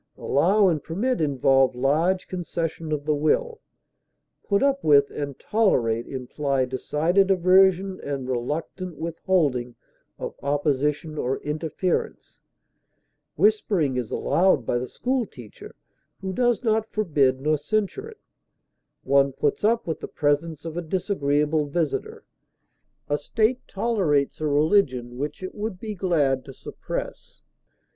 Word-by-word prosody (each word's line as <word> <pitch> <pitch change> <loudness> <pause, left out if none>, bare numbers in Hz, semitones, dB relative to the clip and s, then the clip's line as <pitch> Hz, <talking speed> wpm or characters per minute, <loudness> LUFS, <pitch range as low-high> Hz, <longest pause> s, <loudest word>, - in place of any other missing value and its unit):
Allow 195 +8 +3
and 160 -5 0
permit 220 +7 -1
involve 135 -3 +3
large 160 +9 +1
concession 165 -3 -4
of 145 -1 -2
the 155 - +2
will; 445 - 0 0.8
put 200 +3 +1
up 275 0 +1
with 140 -2 +5
and 140 -2 -5
tolerate 120 - +1
imply 135 +1 -1
decided 160 +9 +1
aversion 190 +1 +4
and 140 -3 -4
reluctant 150 +7 -4
withholding 155 -7 0 0.4
of - - -5
opposition 145 +2 -1
or 130 +2 -1
interference; 155 +4 -3 0.9
whispering 200 -9 +2
is 125 -4 -2
allowed 175 -8 +2
by 120 - 0
the 125 - -4
school 250 -2 -1
teacher 120 - -13 0.4
who 190 -1 -4
does 240 +2 +1
not 220 -1 0
forbid 145 -11 +1
nor 155 +3 +1
censure 215 - -2
it; 445 - -15 0.8
one 140 0 +3
puts 140 +5 -1
up 230 +2 +2
with 160 - -3
the - - -6
presence 150 +2 -1
of 165 -1 -5
a 175 - -2
disagreeable 155 -4 0
visitor; 155 0 -2 0.8
a 145 0 0
state 225 - 0
tolerates 190 -11 0
a 155 - 0
religion 145 -6 +1
which 150 +5 -4
it 185 - -5
would 210 -3 -5
be 215 0 -5
glad 150 -9 +1
to 135 - -11
suppress. - - -7
155 Hz, 130 wpm, -24 LUFS, 140-195 Hz, 0.9 s, with